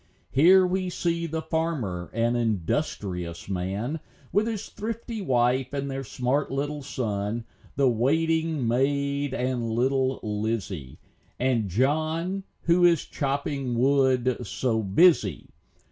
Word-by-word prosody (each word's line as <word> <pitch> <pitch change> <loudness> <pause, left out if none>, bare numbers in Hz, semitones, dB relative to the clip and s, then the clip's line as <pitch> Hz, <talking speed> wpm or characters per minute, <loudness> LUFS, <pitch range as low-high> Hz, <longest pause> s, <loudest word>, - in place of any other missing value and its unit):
Here 185 +7 +6
we 185 0 -1
see 170 -1 -1
the 160 0 -3
farmer, 155 - -2
an 115 +1 +1
industrious 95 - -2
man, 100 - -2 0.3
With 210 +3 +2
his 220 -3 -3
thrifty 225 +1 -5
wife, 125 -3 +1
and 140 -1 -2
their 135 0 -3
smart 130 +4 -1
little 145 +2 -2
son, 110 -3 -3 0.3
The 140 -1 +3
waiting 160 +3 +1
maid 140 +2 0
and 125 -2 -1
little 130 +3 +1
Lizzy, 105 - -3 0.4
And 120 -5 +1
John, 155 - 0 0.2
who 170 +1 +3
is 170 -3 +4
chopping 140 -2 -2
wood, 130 -1 +3
so 115 -4 -1
busy. 105 - +3
135 Hz, 115 wpm, -26 LUFS, 115-160 Hz, 0.4 s, Here